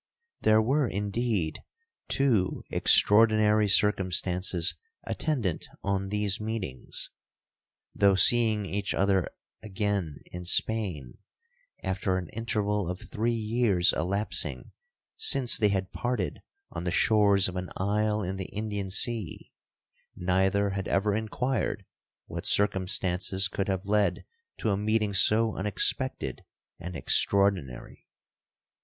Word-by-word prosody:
'There 110 0 +4
were, 135 +3 +1
indeed, 100 -4 -2 0.5
two 115 -9 +1
extraordinary 110 0 +4
circumstances 90 -3 +2 0.3
attendant 120 - -2 0.2
on 95 -1 -1
these 105 0 0
meetings. 105 - -4 0.8
Though 100 -1 +3
seeing 110 +1 +4
each 100 +1 -3
other 95 -2 +1 0.3
again 100 -7 -3
in 90 0 -7
Spain, 90 - -1 0.6
after 95 0 -1
an 90 -3 -5
interval 105 -4 -2
of 90 +1 -4
three 115 +2 0
years 110 -5 +2
elapsing 100 +6 -2 0.5
since 135 - +3
they 105 -2 +3
had 95 -2 -2
parted 120 -6 -3 0.3
on - - -6
the 90 - -1
shores 100 +1 +3
of 90 - -6
an 90 0 -4
isle 105 +2 0
in 95 +1 -4
the 95 - -5
Indian 105 -2 -4
sea, 105 -2 -3 0.6
neither 95 +2 +1
had 95 0 -4
ever 100 +1 +1
inquired 110 +5 -2 0.4
what - - -6
circumstances 95 -1 +2
could 100 +1 -3
have 95 0 -2
led 105 0 0 0.3
to 110 - -1
a 100 - 0
meeting 105 0 0
so 110 +3 +3
unexpected 100 +1 -1 0.4
and 90 +1 -7
extraordinary. 95 -9 0
100 Hz, 110 wpm, -27 LUFS, 95-110 Hz, 0.8 s, There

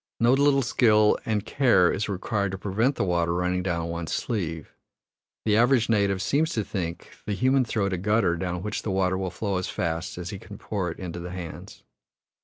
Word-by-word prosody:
No 120 +2 +4
little 140 0 +4
skill 110 -3 +4
and 110 -2 0
care 115 -10 +4
is 105 +2 -2
required 100 0 -1
to - - -3
prevent 110 +8 0
the - - 0
water 85 -2 +1
running 90 +1 0
down 85 -2 -2
one's 85 -1 -4
sleeve: 85 -9 -3 0.7
the 105 -2 +3
average 120 0 +3
native 100 -3 +2
seems 155 +8 +1
to 110 - 0
think 85 -4 -5 0.2
the 105 - 0
human 130 +4 +3
throat 100 -4 -1
a 90 - -2
gutter 105 -2 +2
down 90 +1 -3
which 105 0 -3
the - - -4
water 95 -1 +1
will 95 0 -2
flow 100 +2 -2
as 90 - -3
fast 85 +1 -3
as 90 +2 -5
he 100 - -6
can 100 0 -11
pour 95 -5 -3
it 85 - -7
into 90 -2 -6
the 90 +1 -6
hands. 90 -2 -8
95 Hz, 205 wpm, -26 LUFS, 90-110 Hz, 0.7 s, No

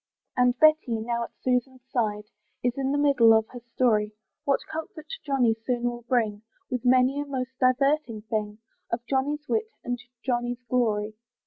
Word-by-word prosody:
And 250 0 +3
Betty, 310 -7 +4
now 235 +1 -1
at - - -12
Susan's 255 0 0
side, 210 -4 0 0.4
Is 245 -1 +2
in 270 0 -1
the 285 - +1
middle 275 -6 +5
of 220 - 0
her 245 - -9 0.2
story, 215 -4 +2 0.3
What 275 - +2
comfort 315 0 -6 0.2
Johnny 265 -6 +2
soon 240 +2 -3
will 240 0 -1
bring, 220 -5 +1 0.3
With 250 -2 -2
many 255 +2 +4
a 290 - -2
most 260 -2 -3
diverting 255 -3 +2
thing, 215 -1 -3 0.3
Of 235 +1 -2
Johnny's 290 +3 -1
wit 440 +4 0
and 245 0 -2 0.3
Johnny's 245 -1 -1
glory. 215 -4 +1
250 Hz, 160 wpm, -26 LUFS, 230-275 Hz, 0.4 s, middle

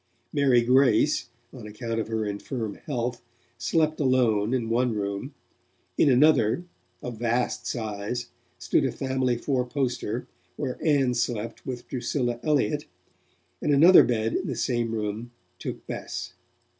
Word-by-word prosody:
Mary 135 -5 +4
Grace, 130 +2 +3 0.2
on 120 -5 -9
account 115 +2 -4
of 110 - -2
her 110 -1 -1
infirm 105 +2 -4
health, 120 -4 -2 0.4
slept 155 +6 +1
alone 120 -6 +2
in 125 -3 0
one 120 0 +1
room; 100 -1 -4 0.6
in 145 - +4
another, 135 +1 +4 0.4
of 120 -3 -6
vast 120 +1 0
size, 110 +1 -3 0.3
stood - - +1
a - - +1
family 130 -2 0
fourposter, 125 -3 -1 0.3
where 125 - -4
Ann 140 -5 +3
slept 115 0 -3
with 125 -2 -5
Drusilla 120 -1 -2
Elliott, 150 0 +1 0.8
and 150 - +1
another 170 +6 +8
bed 115 -2 0
in - - -1
the 130 - -2
same 120 -1 0
room 110 +2 -3 0.3
took - - -6
Bess. - - -5
120 Hz, 130 wpm, -26 LUFS, 115-130 Hz, 0.8 s, another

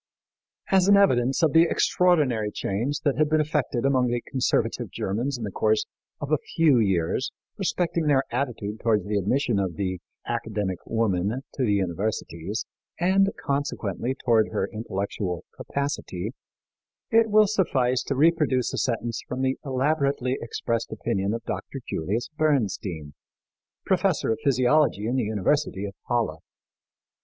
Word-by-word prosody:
As 190 -1 +4
an 200 0 +7
evidence 135 -7 +3
of 155 - +3
the 165 +1 +6
extraordinary 145 -12 +2
change 115 +9 -2
that 145 -2 0
had 155 -1 +3
been 155 0 +3
effected 150 -5 0
among 130 -2 +3
the 120 0 0
conservative 130 -2 -1
Germans 120 +8 -2
in 120 - -6
the 105 - -3
course 435 - +1 0.3
of - - -5
a - - +3 0.2
few 155 -7 +5
years 95 +4 +1 0.3
respecting 175 -4 -1
their 135 -2 +4
attitude 115 -5 -3
toward 110 -5 +1
the 105 +1 -2
admission 115 +2 +1
of 95 -4 -2
the 95 0 -2 0.3
"Academic 95 -4 -2
Woman" 100 -5 +1 0.2
to 135 - -1
the 105 -4 +2
universities, 95 0 -2 0.3
and, 190 +3 +4
consequently, 130 -4 -2
toward 115 -3 +4
her - - -1
intellectual 100 -4 -3
capacity, 135 -8 -3 0.8
it 225 0 +5
will 215 0 +6
suffice 135 -12 +1
to 140 - -2
reproduce 150 -4 +2
a - - -1
sentence 115 -1 -1
from 130 +1 -3
the 130 0 0
elaborately 140 -1 0
expressed 115 0 -2
opinion 100 -4 -1
of 115 +1 -3
Dr. 135 - -5
Julius 100 +9 -2
Bernstein, 105 - -1 0.7
professor 185 - +1
of 110 - -1
physiology 130 -4 +3
in 120 +3 0
the 130 - +1
University 105 +1 0
of 100 - -6 0.2
Halle. 110 -10 0
125 Hz, 145 wpm, -25 LUFS, 105-150 Hz, 0.8 s, an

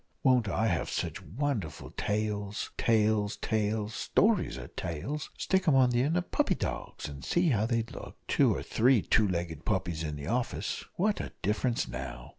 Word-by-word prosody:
won't 125 -5 +4
I 110 - +1
have 85 -6 0
sich - - -3
wonderful 105 - -3
tales 105 0 -2
tales 110 -2 +2
tails 110 0 -1
stories 205 - +2
are 60 -2 -7
tails 135 - -4
stick 190 -1 +1
'em 150 - +5
on 130 -2 +5
the 120 0 +2
end 155 +6 +2
of 175 - -3
puppy - - +2
dogs, - - -4
and 70 -2 -8
see 175 -1 +2
how 110 -4 +2
they'd 115 -1 -1
look - - -9
two - - +4
or - - -2
three 120 -2 +3
two 110 -2 +3
legged 85 -4 -3
puppies 85 -6 -1
in 75 -2 -3
the 70 -1 -6
office 120 +6 -2
what 205 +3 +1
a - - -7
difference 115 +4 +1
now! - - -6
110 Hz, 180 wpm, -30 LUFS, 90-130 Hz, -, em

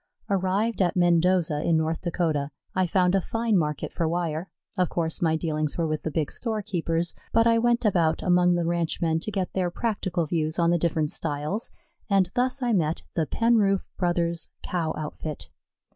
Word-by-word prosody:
Arrived 200 +4 +1
at 180 - +2
Mendoza, 175 -3 +3
in 165 0 +2
North 160 +1 -1
Dakota, 160 -5 -1 0.2
I 185 -1 +1
found 180 +1 +2
a 195 - +3
fine 225 +2 0
market 150 -5 -1
for 165 - 0
wire. 170 +1 -2 0.3
Of 180 -3 +1
course 165 -2 -1
my 160 -2 +3
dealings 155 -2 -2
were 170 - +1
with 155 -1 -2
the - - -3
big 155 -1 -1
storekeepers, 180 -7 -1 0.2
but 230 0 +4
I 230 0 +4
went 240 +1 +2
about 170 -6 +2
among 180 -1 +4
the 175 -1 0
ranchmen 165 -1 0
to 190 - -4
get 190 -3 -2
their 185 -2 0
practical 185 -4 -1
views 155 0 -1
on 170 -1 +3
the 175 - +2
different 155 -2 0
styles, 155 +8 -3 0.4
and 195 -3 +3
thus 255 +1 0
I 240 -1 +1
met 165 -4 0
the 160 -3 0
Penroof 215 -4 +2
Brothers' 170 -2 0
Cow 165 -3 -1
outfit. 150 - -6
175 Hz, 175 wpm, -26 LUFS, 160-195 Hz, 0.4 s, but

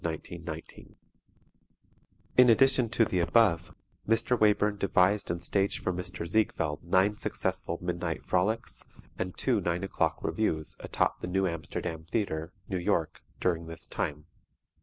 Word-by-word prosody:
[Illustration: 85 +1 -5
OSCAR 80 +1 -7
SHAW] - - -12 1.5
In 125 -1 +9
addition 130 0 +5
to 115 0 +3
the 90 - 0
above, 85 -3 +3 0.3
Mr. 115 +2 +3
Wayburn 105 -2 +3
devised 100 +1 +2
and 85 0 -2
staged 100 +1 0
for 90 - 0
Mr. 90 -1 -5
Ziegfeld 85 -6 0
nine 95 +4 +2
successful 95 -4 -2
Midnight 90 -1 -3
Frolics 105 +5 -1 0.4
and 90 -1 -3
two 120 -6 +1
Nine 85 +1 -1
O'Clock 95 - -1
Revues 80 -8 -1
atop - - -1
the - - -3
New 95 +1 +1
Amsterdam 80 -1 -4
Theatre, 85 -6 -1 0.2
New 95 - -2
York, 85 -2 0 0.2
during 85 -2 0
this 80 0 -7
time. 75 0 -3
90 Hz, 140 wpm, -29 LUFS, 85-105 Hz, 1.5 s, In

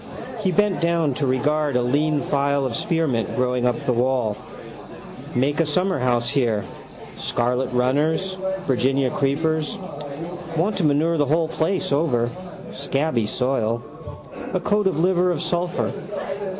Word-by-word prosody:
He 195 -3 +1
bent 210 0 +2
down 170 -4 +2
to 140 +1 -1
regard 145 +2 +1
a 125 - +3
lean 145 +4 +1
file 140 0 +1
of 125 -3 -2
spearmint 160 -9 0
growing 125 -1 +1
by 125 - +3
the 125 +1 -1
wall. 120 -3 +1 1.0
Make 140 +5 +1
a 165 - +4
summerhouse 135 -8 +1
here. 120 -7 +1 0.6
Scarlet 125 +2 0
runners. 150 +9 +1 0.3
Virginia 135 -3 +1
creepers. 155 +6 0 0.8
Want 190 +6 +1
to 180 - +1
manure 155 +3 +2
the 145 - +3
whole 160 +3 +2
place 165 +3 -1
over, 125 -6 +1 0.4
scabby 140 -4 0
soil. 120 -1 0 0.7
A - - +2
coat 205 -1 +1
of 185 - 0
liver 180 +1 +3
of 175 -4 0
sulphur. 175 +2 -1
140 Hz, 135 wpm, -23 LUFS, 125-165 Hz, 1.0 s, a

